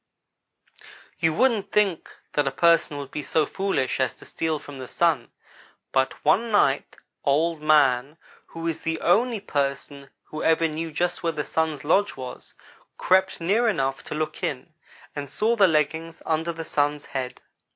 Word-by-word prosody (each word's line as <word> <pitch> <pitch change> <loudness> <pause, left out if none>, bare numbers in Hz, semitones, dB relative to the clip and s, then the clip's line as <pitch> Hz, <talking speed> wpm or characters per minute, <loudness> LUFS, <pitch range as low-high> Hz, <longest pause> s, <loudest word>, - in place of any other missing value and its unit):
"You 165 -1 +3
wouldn't 230 -2 +2
think 200 -6 +1 0.2
that 145 -2 +1
a - - +1
person 165 0 +3
would 140 -1 -7
be 150 - -4
so 150 +2 +1
foolish 190 -9 -1
as 130 -2 0
to - - -15
steal 160 -1 -2
from 145 -2 -10
the 130 - -7
Sun, 160 -7 +1 0.6
but 130 0 0
one 230 +3 +3
night 145 -10 +2 0.3
Old 155 +3 +1
man 145 -2 +3 0.3
who 165 0 -6
is 165 -1 -2
the 160 0 -2
only 230 +6 +3
person 140 -5 -3
who 155 - -7
ever 165 0 +3
knew 160 +1 -4
just 175 +4 -1
where 165 -1 0
the 150 -1 -2
Sun's 160 -3 -1
lodge 200 +7 +2
was 125 -1 -8 0.4
crept 190 +1 +2
near 205 +8 +2
enough 135 -10 0
to - - -5
look 155 0 -3
in, 145 +4 -4 0.4
and 145 -2 -5
saw 220 - +1
the 200 -4 +6
leggings 160 +1 -1
under 160 +1 0
the 165 -1 -7
Sun's 145 -1 0
head. 130 -2 -5
160 Hz, 165 wpm, -25 LUFS, 140-170 Hz, 0.6 s, the